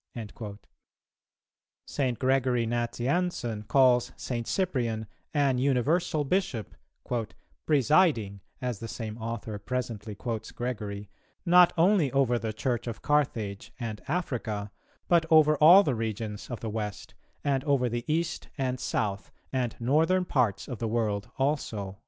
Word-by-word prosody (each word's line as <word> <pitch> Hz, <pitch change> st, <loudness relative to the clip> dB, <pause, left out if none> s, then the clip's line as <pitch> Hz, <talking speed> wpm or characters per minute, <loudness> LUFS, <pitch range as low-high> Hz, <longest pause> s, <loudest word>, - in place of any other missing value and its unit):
"[266:1] 105 Hz, -2 st, -7 dB, 1.3 s
St. 130 Hz, -5 st, -1 dB
Gregory 130 Hz, -2 st, +2 dB
Nazianzen 120 Hz, -, -1 dB
calls 125 Hz, -3 st, +4 dB
St. 120 Hz, -2 st, -4 dB
Cyprian 120 Hz, -, -1 dB, 0.3 s
an 140 Hz, -4 st, +2 dB
universal 145 Hz, +5 st, +1 dB
Bishop, 135 Hz, -, -1 dB, 0.9 s
"presiding," 140 Hz, -, +3 dB, 0.2 s
as 125 Hz, -5 st, -2 dB
the 115 Hz, -, -6 dB
same 110 Hz, -2 st, -5 dB
author 110 Hz, -2 st, -5 dB
presently 115 Hz, -3 st, -4 dB
quotes 115 Hz, 0 st, -4 dB
Gregory, 105 Hz, -4 st, -4 dB, 0.4 s
"not 175 Hz, 0 st, +7 dB
only 170 Hz, -4 st, +4 dB
over 125 Hz, -3 st, +2 dB
the 110 Hz, -1 st, -3 dB
Church 120 Hz, +2 st, -2 dB
of 115 Hz, -, -6 dB
Carthage 115 Hz, -9 st, 0 dB
and 110 Hz, -3 st, -5 dB
Africa, 115 Hz, -, -2 dB, 0.4 s
but 170 Hz, -2 st, +3 dB
over 155 Hz, -1 st, +6 dB
all 175 Hz, +7 st, +8 dB
the 140 Hz, -, 0 dB
regions 110 Hz, -2 st, -4 dB
of 120 Hz, -, -5 dB
the 115 Hz, -, -3 dB
West, 105 Hz, -2 st, -5 dB, 0.3 s
and 135 Hz, -2 st, +1 dB
over 140 Hz, -4 st, +2 dB
the 120 Hz, 0 st, -3 dB
East, 165 Hz, +1 st, -1 dB
and 130 Hz, -2 st, -1 dB
South, 100 Hz, -3 st, -2 dB, 0.2 s
and 125 Hz, -3 st, -1 dB
Northern 160 Hz, +9 st, +2 dB
parts 125 Hz, -, 0 dB
of 125 Hz, -5 st, -6 dB
the 115 Hz, -, -1 dB
world 110 Hz, -1 st, -1 dB
also." 110 Hz, -9 st, -2 dB
125 Hz, 130 wpm, -28 LUFS, 110-145 Hz, 1.3 s, all